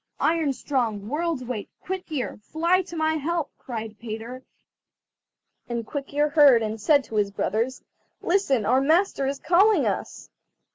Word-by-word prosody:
"Iron 320 -3 +2
strong, 240 -6 -2
World's 315 -1 -1
weight, 240 -4 -5
Quick 370 -1 -6
ear, 265 -8 -3
fly 340 - +1
to 345 -2 -9
my 315 0 +1
help!" 330 +1 -2
cried 220 -3 -6
Peter; 230 +3 -7 1.3
and 235 -1 -3
Quick 280 +3 -6
ear 295 +1 +2
heard, 285 -7 +6
and 215 0 -4
said 285 +5 +4
to 220 - -6
his 205 -1 +2
brothers: 225 +5 -2 0.4
"Listen, 310 - +1
our 255 +5 +3
master 315 -1 +2
is 275 +1 -2
calling 375 +9 +4
us." - - -3
275 Hz, 150 wpm, -25 LUFS, 230-325 Hz, 1.3 s, heard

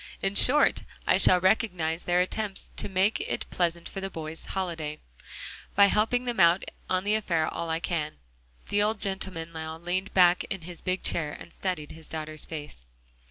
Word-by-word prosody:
In 195 0 0
short, 285 +8 +5 0.2
I - - +4
shall 180 - +6
recognize 180 -4 +1
their 175 0 +3
attempt 195 +1 -3
to - - -2
make 195 +3 +2
it - - -3
pleasant 170 -1 0
for 195 - -6
the 195 - -3
boys' 160 -2 -7
holiday, 165 -5 -3 0.8
by 200 - +8
helping 225 +5 +2
them 240 -4 -2
out 170 +1 +5 0.3
on 185 0 +1
the 205 +1 +1
affair 170 -7 +1
all 170 - -4
I 160 0 0
can." 165 -3 -2 0.6
The 205 - +2
old 210 +1 +1
gentleman 190 -4 -2
now 160 0 -6
leaned 180 +3 -2
back 180 -1 +6
in 195 - -4
his 170 +1 -7
big 185 0 -1
chair 150 -3 +1
and 170 - -11
studied 180 -6 -3
his 160 0 -11
daughter's 155 -1 -4
face. 145 - -8
180 Hz, 180 wpm, -28 LUFS, 160-195 Hz, 0.8 s, by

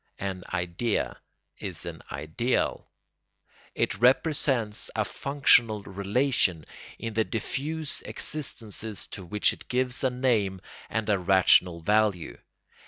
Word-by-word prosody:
An 95 -2 -4
idea 90 +5 -1 0.4
is - - -6
an - - -7
ideal. 115 +12 -1 0.9
It - - 0
represents 125 -3 +2
a - - +1
functional 120 -6 +3
relation 100 - 0 0.3
in 115 -1 -5
the 110 +1 +2
diffuse 145 +8 -3
existences 110 -7 -3
to 100 - -8
which 105 +4 +2
it - - -13
gives 125 +1 0
a 130 - +4
name 115 -7 +1 0.3
and 110 -1 -2
a 100 -2 +2
rational 90 -2 +4
value. 100 - +1
110 Hz, 110 wpm, -27 LUFS, 95-125 Hz, 0.9 s, a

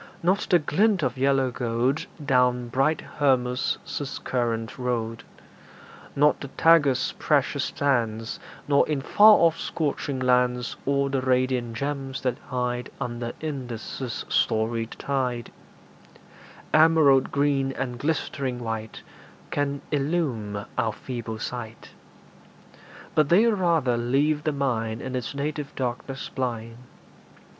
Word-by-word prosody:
Not 185 +3 +2
the 180 - +6
glint 185 +4 +2
of - - 0
yellow 135 -1 +2
gold 120 +4 -1 0.2
Down 125 -2 +2
bright 135 +5 +1 0.2
Hermus' 125 -3 +2 0.5
current 115 -2 -2
rolled; 115 -2 -2 0.9
Not 150 +1 +4
the 140 - -5
Tagus' 145 -2 +3
precious - - +1
sands, 115 -5 -1 0.3
Nor 140 +1 +3
in 145 -3 0
far 210 +8 +7
off 165 -1 +3
scorching 145 -3 -2
lands 125 -1 +1
All 140 0 +2
the 135 -1 -1
radiant 125 -2 0
gems 135 0 -3
that 125 -2 -1
hide 125 -1 -2
Under 120 -2 -4
Indus' 130 -4 -5
storied 115 +1 +1
tide 125 -4 -2 1.2
Emerald 155 -4 +5
green 140 -1 +1
and 125 -2 -4
glistering 140 -3 -2
white 110 -2 -5 0.5
Can 140 -1 -1
illume 135 -9 -1
our 110 -1 +1
feeble 115 -1 -6
sight; 115 -1 -6 1.2
But 150 -2 +3
they 195 +7 +6
rather 170 - +2
leave 140 +6 +1
the 155 - +2
mind 115 -6 -1
In 130 0 -4
its 125 +3 -4
native 145 0 -4
darkness 130 +1 -4
blind. 115 -3 -4
130 Hz, 115 wpm, -25 LUFS, 120-145 Hz, 1.2 s, far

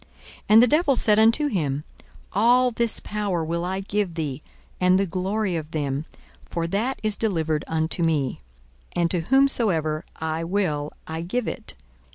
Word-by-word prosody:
42:004:006 - - -25 0.4
And 220 +2 +8
the - - +5
devil 300 +1 +3
said 215 -3 +3
unto 230 +7 +4
him, 150 - -1 0.5
All 245 +5 +4
this 235 -1 +1
power 200 -6 -2
will 170 +1 -2
I 190 +2 -2
give 195 -3 -2
thee, 150 -4 -3 0.4
and 180 0 +4
the 195 - +2
glory 190 +2 -1
of 155 -2 -4
them: 145 -2 -2 0.4
for 170 -1 -2
that 215 +10 -1
is 215 -1 +2
delivered 160 -9 -1
unto 160 +2 -1
me; 155 -6 0 0.5
and 170 -1 +1
to 180 - +2
whomsoever 180 - +2
I 160 +1 -3
will 165 -5 -1
I 160 +1 -5
give 215 +8 -2
it. - - -6
180 Hz, 165 wpm, -24 LUFS, 160-215 Hz, 0.5 s, And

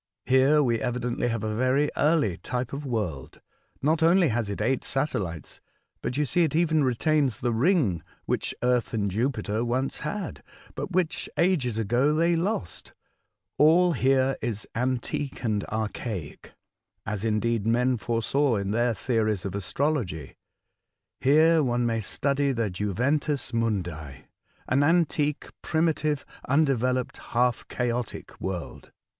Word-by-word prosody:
Here 135 +4 +4
we 120 -3 +1
evidently 120 0 -1
have 115 -3 -2
a 110 0 -1
very 130 +5 +2
early 150 - +2
type 125 0 -4
of 140 0 -5
world. 90 - -3 0.4
Not 155 +3 +2
only 170 0 +5
has 115 -3 -1
it 100 - -4
eight 120 +5 0
satellites, 100 - -3 0.4
but 125 - -3
you 150 - +2
see 175 +6 +1
it 155 -2 0
even 160 -2 +3
retains 130 -1 +1
the 120 -1 0
ring 120 - +2 0.2
which - - -2
Earth 125 -2 +1
and 100 -3 0
Jupiter 110 -1 -1
once 130 +3 -1
had, 175 +4 -4 0.3
but - - -5
which 180 -2 -1
ages 150 - +1
ago 120 +7 +2
they 170 +2 +3
lost. 170 - -3 0.7
All 170 +4 +5
here 135 0 +2
is 110 -3 -3
antique 130 +3 -2
and 105 -3 0
archaic, 110 -5 -5 0.5
as, 105 -2 -3
indeed, 110 0 0
men 125 +1 +2
foresaw 120 +4 +1
in 100 -1 -2
their 120 +1 +1
theories 110 -6 0
of 95 - -3
astrology. 100 - -2 0.8
Here 155 +4 +5
one 120 -3 +1
may 115 -1 0
study 140 +5 0
the 115 -5 -1
juventus 125 +10 0
nnundi 90 - -2 0.2
— - - -36
an 130 +2 +2
antique, 150 -2 +1
primitive, 155 -3 0 0.2
undeveloped, 130 -3 +1
half 120 0 0
chaotic 120 -2 -3
world." 95 -3 -5
125 Hz, 135 wpm, -26 LUFS, 110-145 Hz, 0.8 s, only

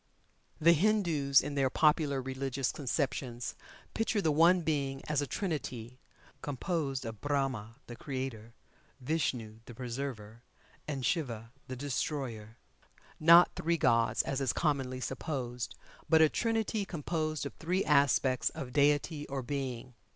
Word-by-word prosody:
The 170 +2 +6
Hindus 165 -7 +3
in 145 +1 -5
their 135 -2 +2
popular 150 -2 +2
religious 135 0 -2
conceptions 130 -3 -2 0.4
picture 225 -1 0
the 160 -6 +2
One 170 +4 +5
Being 140 -4 -1
as 150 -1 +1
a 145 - -2
Trinity, 130 - -4 0.4
composed 140 -2 -2
of 110 -2 -7
Brahma, 135 -6 -1
the 120 - -9
Creator; 130 -4 -5 0.5
Vishnu, 125 -6 -2
the 120 - -11
Preserver, 120 -3 -5 0.5
and 135 -4 -3
Siva, 115 -7 -2 0.2
the 130 - -5
Destroyer 125 -5 -3 0.6
not 170 +2 +8
three 170 +1 0
gods, 115 -6 +3
as 140 0 -2
is 130 -3 +1
commonly 135 -5 -1
supposed, 125 - -4 0.3
but 160 - +6
a 160 -1 +6
Trinity 225 0 0
composed 155 -3 -3
of 140 - -5
three 180 +4 0
aspects 140 -3 +3
of 125 -2 -7
Deity 145 +1 +2
or 135 -1 -4
Being. 130 -2 -4
140 Hz, 130 wpm, -31 LUFS, 125-155 Hz, 0.6 s, not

